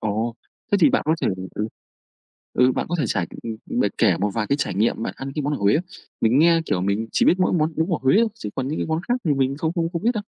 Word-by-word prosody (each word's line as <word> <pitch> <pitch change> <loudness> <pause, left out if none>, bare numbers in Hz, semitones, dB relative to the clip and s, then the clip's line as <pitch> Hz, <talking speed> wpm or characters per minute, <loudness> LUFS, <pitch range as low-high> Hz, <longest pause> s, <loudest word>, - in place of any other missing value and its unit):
Ồ, 110 +2 -1 0.4
thế 200 - +5
thì 280 - +6
bạn 260 - +2
có 160 - +3
thể - - +2 0.3
ừ, 110 +1 -2 0.8
ừ, 125 +1 +4
bạn - - -2
có 175 - -2
thể 145 - +1
trải, 95 -4 0 0.2
ừm 115 - -4
bạn - - +2
kể 95 -7 +4
một 105 +2 0
vài 110 -2 -1
cái 140 - +2
trải 140 - -2
nghiệm 110 +3 +1
bạn - - -2
ăn 135 0 -6
cái 150 - -2
món 145 +2 -1
ở - - -1
Huế 100 0 +3
không? 170 +4 0 0.4
Mình 115 +4 +3
nghe, 165 +1 +5
kiểu, 90 - 0
mình 100 +4 0
chỉ - - +3
biết 180 - +4
mỗi 180 - +2
món 160 -2 +1
bún 160 +3 0
bò 170 - 0
Huế 135 +9 +4
thôi, 230 - +4
chứ 220 - -6
còn 130 0 -2
những 155 - -3
cái - - -1
món 160 +1 -1
khác 245 - +3
thì 150 -4 +2
mình 135 0 0
không 160 +2 -1
không 170 -2 -1
không 170 +1 -3
biết 235 - +3
đâu. 215 - -2
140 Hz, 300 wpm, -23 LUFS, 110-165 Hz, 0.8 s, thì